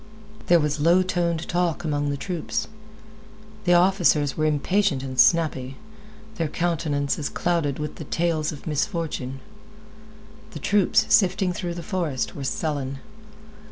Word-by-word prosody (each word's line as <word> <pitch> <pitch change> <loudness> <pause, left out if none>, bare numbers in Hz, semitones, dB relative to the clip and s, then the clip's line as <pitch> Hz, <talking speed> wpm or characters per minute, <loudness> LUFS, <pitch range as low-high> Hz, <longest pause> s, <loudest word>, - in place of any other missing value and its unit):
There 175 -1 +6
was 150 -1 -1
low 170 +5 +4
toned 170 -3 -1
talk 175 -2 0
among 145 -2 -1
the 140 - -2
troops. 185 +7 -3 1.0
The 175 0 +5
officers 175 -5 +3
were 155 0 +1
impatient 155 0 +1
and 130 -1 -5
snappy, 135 -6 +3 0.6
their 165 - 0
countenances 150 -3 -1
clouded 170 -6 -1
with 150 0 -5
the 155 - -7
tales 160 -1 0
of 145 - -10
misfortune. 150 -5 -3 1.1
The - - -6
troops, 205 -2 +3
sifting 190 -3 +3
through 175 -1 -4
the 170 - -6
forest, 165 - -2
were 140 - -6
sullen. 140 -1 -2
165 Hz, 130 wpm, -24 LUFS, 145-175 Hz, 1.1 s, There